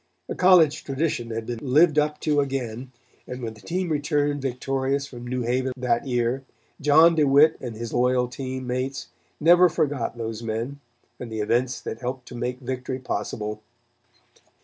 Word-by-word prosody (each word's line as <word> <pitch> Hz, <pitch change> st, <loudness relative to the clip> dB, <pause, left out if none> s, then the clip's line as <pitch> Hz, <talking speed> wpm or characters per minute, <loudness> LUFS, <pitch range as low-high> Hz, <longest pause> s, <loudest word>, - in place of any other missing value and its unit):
A -, -, -3 dB
college 180 Hz, -5 st, +5 dB
tradition 135 Hz, -4 st, -2 dB
had 115 Hz, 0 st, -4 dB
been 120 Hz, -1 st, -4 dB
lived 150 Hz, +3 st, +4 dB
up 150 Hz, 0 st, 0 dB
to 150 Hz, -1 st, +2 dB
again, 130 Hz, -3 st, -3 dB, 0.4 s
and 125 Hz, 0 st, -6 dB
when 110 Hz, -1 st, -4 dB
the 110 Hz, -, -16 dB
team 180 Hz, +1 st, -2 dB
returned 145 Hz, -1 st, 0 dB
victorious 135 Hz, +1 st, -1 dB
from 120 Hz, -3 st, -9 dB
New 125 Hz, 0 st, -2 dB
Haven 130 Hz, +2 st, 0 dB
that 125 Hz, 0 st, 0 dB
year, 120 Hz, +1 st, 0 dB, 0.4 s
John 155 Hz, +4 st, +6 dB
DeWitt 150 Hz, 0 st, +5 dB
and 120 Hz, -3 st, -6 dB
his 115 Hz, +1 st, -6 dB
loyal 125 Hz, 0 st, +2 dB
team 130 Hz, +1 st, -5 dB
mates 130 Hz, +2 st, -3 dB, 0.3 s
never 175 Hz, +3 st, +6 dB
forgot 140 Hz, -7 st, -1 dB
those 115 Hz, -1 st, -4 dB
men 115 Hz, +5 st, -4 dB, 0.4 s
and 120 Hz, -2 st, -7 dB
the 110 Hz, -, -4 dB
events 120 Hz, +4 st, 0 dB
that 110 Hz, -, -6 dB
helped 125 Hz, 0 st, -5 dB
to 125 Hz, -, -9 dB
make 125 Hz, +2 st, -3 dB
victory 130 Hz, 0 st, -4 dB
possible. 105 Hz, -4 st, -4 dB
130 Hz, 165 wpm, -24 LUFS, 120-145 Hz, 0.4 s, John